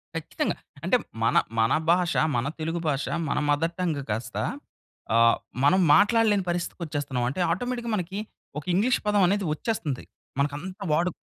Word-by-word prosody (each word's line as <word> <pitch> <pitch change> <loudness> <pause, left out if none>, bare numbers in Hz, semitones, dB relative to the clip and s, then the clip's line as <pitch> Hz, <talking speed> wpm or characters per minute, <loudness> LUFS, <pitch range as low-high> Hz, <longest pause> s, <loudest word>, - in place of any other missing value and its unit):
ఖచ్చితంగా. - - -2 0.3
అంటే - - +4 0.3
మన, - - +2 0.2
మన 115 - +3 0.2
భాష, 175 -1 +2 0.2
మన 120 +2 0
తెలుగు 165 +2 -2
భాష 140 -1 0 0.2
మన - - 0
మదర్ 165 +4 +1
టంగ్ 160 -6 0
కాస్త, 110 +3 -3 0.8
అహ్, 115 0 +6 0.3
మనం 185 +7 +5 0.2
మాట్లాడలేని 210 0 +4
పరిస్థితికి 175 0 -3
వచ్చేస్తున్నాం. 145 -5 -2
అంటే 180 +7 -3
ఆటోమేటిక్‌గా 240 +4 -2
మనకి 190 +2 -3 0.4
ఒక - - -13
ఇంగ్లీష్ 230 +7 +3
పదం 205 -2 +4
అనేది 200 0 +1
వచ్చేస్తుంది. 155 - -3 0.4
మనకంతా 160 +8 -2
వాడు 175 +3 +2
175 Hz, 145 wpm, -26 LUFS, 145-200 Hz, 0.8 s, అహ్